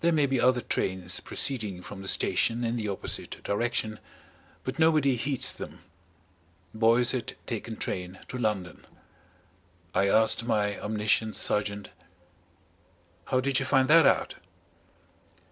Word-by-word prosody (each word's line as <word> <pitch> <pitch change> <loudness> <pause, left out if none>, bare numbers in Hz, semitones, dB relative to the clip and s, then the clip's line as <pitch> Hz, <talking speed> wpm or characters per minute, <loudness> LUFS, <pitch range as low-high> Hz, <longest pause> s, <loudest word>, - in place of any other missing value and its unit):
There 170 - +3
may 150 -3 +3
be 135 -3 0
other 125 0 +3
trains 95 -5 -1
proceeding 105 -9 -1
from 100 -2 -9
the 95 - -8
station 115 +4 +1
in 115 0 -1
the 110 -3 -3
opposite 100 -2 -3
direction 110 0 -1 0.6
but 130 +4 -5
nobody 155 -5 +4
heeds 135 +1 0
them. 80 +3 -9 0.9
Boyce 115 +2 +3
had 130 -3 -3
taken 115 -1 -5
train 90 0 -4
to 125 - -5
London. 100 -7 -2 1.1
I 100 - +2
asked 110 +2 +3
my 105 -3 0
omniscient 110 +1 0
sergeant: 105 -1 -1 1.4
"How 130 -1 +1
did 135 0 +1
you 135 - -2
find 135 -2 +3
that 160 -1 +7
out?" - - +2
115 Hz, 130 wpm, -28 LUFS, 105-130 Hz, 1.4 s, that